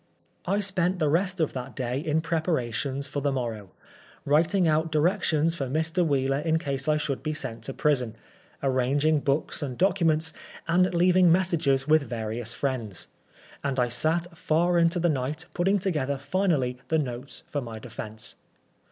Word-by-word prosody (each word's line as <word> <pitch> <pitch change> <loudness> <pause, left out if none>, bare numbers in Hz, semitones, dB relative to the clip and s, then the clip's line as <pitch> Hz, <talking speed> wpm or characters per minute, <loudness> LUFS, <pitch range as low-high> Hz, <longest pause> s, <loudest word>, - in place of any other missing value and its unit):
I 200 +3 +1
spent 185 -2 +1
the 155 -4 +1
rest 185 +3 +1
of 160 - +1
that 125 0 -6
day 125 0 -2
in 155 +1 0
preparations 140 -5 -1
for 145 0 -3
the 140 0 +1
morrow 115 -7 -3 0.3
— - - -26
writing 170 +3 +3
out 160 +1 +1
directions 165 -1 +2
for 140 -5 -3
Mr. 160 +6 0
Wheeler 135 -3 +1
in 160 +1 +1
case 140 -4 -2
I 155 0 +3
should 145 -3 -2
be 155 0 -2
sent 130 -7 -4
to 135 - -4
prison, 125 -7 +1 0.5
arranging 140 +4 +2
books 140 +3 -1
and 130 -4 -4
documents, 165 -4 +2 0.3
and 180 +2 +3
leaving 180 0 +5
messages 160 -7 +2
with 155 0 +5
various 115 -2 -3
friends; 120 -10 -3 0.5
and 135 -2 -1
I 125 -1 +2
sat 165 +7 0
far 170 +2 +2
into 170 +1 +3
the 175 - +2
night 150 +2 -2
putting 190 +3 +2
together 150 -8 -1
finally 140 -4 0
the 160 - +2
notes 130 -2 -4
for 145 - -3
my 115 -3 -7
defence. 110 -1 -6
150 Hz, 165 wpm, -26 LUFS, 130-170 Hz, 0.5 s, leaving